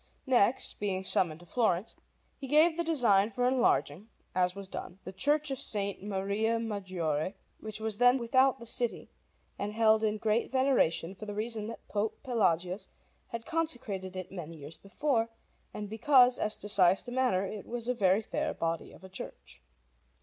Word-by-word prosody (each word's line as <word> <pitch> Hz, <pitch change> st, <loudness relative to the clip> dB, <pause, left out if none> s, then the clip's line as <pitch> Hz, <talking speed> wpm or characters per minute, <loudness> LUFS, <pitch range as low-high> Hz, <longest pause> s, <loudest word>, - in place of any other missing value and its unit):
Next, 250 Hz, -2 st, +2 dB
being 190 Hz, -2 st, -1 dB
summoned 170 Hz, -3 st, +2 dB
to -, -, -14 dB
Florence, 210 Hz, -1 st, 0 dB, 0.4 s
he 270 Hz, -, -8 dB
gave 310 Hz, +4 st, +5 dB
the 340 Hz, -, -1 dB
design 235 Hz, -11 st, +3 dB
for 245 Hz, +3 st, 0 dB
enlarging, 225 Hz, -, +1 dB, 0.2 s
as 180 Hz, 0 st, +1 dB
was 200 Hz, -1 st, -8 dB
done, 185 Hz, -1 st, -7 dB
the 185 Hz, -, -7 dB
Church 290 Hz, +7 st, +1 dB
of 265 Hz, -, -3 dB
S. 250 Hz, -, -3 dB, 0.3 s
Maria 205 Hz, +3 st, -1 dB
Maggiore, 185 Hz, -6 st, -2 dB, 0.2 s
which 215 Hz, -1 st, -6 dB
was 220 Hz, -1 st, -2 dB
then 245 Hz, +1 st, +6 dB
without 260 Hz, +2 st, +3 dB
the 235 Hz, -, -9 dB
city, 235 Hz, 0 st, -1 dB, 0.5 s
and 205 Hz, +1 st, -3 dB
held 220 Hz, 0 st, +4 dB
in 215 Hz, 0 st, +1 dB
great 215 Hz, +2 st, 0 dB
veneration 260 Hz, -10 st, +2 dB
for 215 Hz, +2 st, -10 dB
the 205 Hz, -, -5 dB
reason 215 Hz, 0 st, -3 dB
that 230 Hz, -, -9 dB
Pope 210 Hz, +1 st, -2 dB
Pelagius 190 Hz, -, 0 dB, 0.4 s
had 230 Hz, -1 st, -6 dB
consecrated 240 Hz, -, -2 dB
it 185 Hz, -1 st, -6 dB
many 165 Hz, -3 st, -7 dB
years 150 Hz, +1 st, -9 dB
before, 230 Hz, +3 st, -1 dB, 0.4 s
and 210 Hz, -1 st, -6 dB
because, 245 Hz, +3 st, +4 dB
as 215 Hz, -, +1 dB
to 205 Hz, -, -5 dB
size 190 Hz, -1 st, +3 dB
and 245 Hz, -, -5 dB
manner, 245 Hz, -8 st, +2 dB
it 205 Hz, +1 st, -7 dB
was 235 Hz, 0 st, -4 dB
a 250 Hz, -, +2 dB
very 200 Hz, -2 st, +2 dB
fair -, -, -2 dB
body 165 Hz, 0 st, -3 dB
of -, -, -16 dB
a 190 Hz, -, -10 dB
church. 185 Hz, -, -9 dB
215 Hz, 175 wpm, -30 LUFS, 190-245 Hz, 0.5 s, then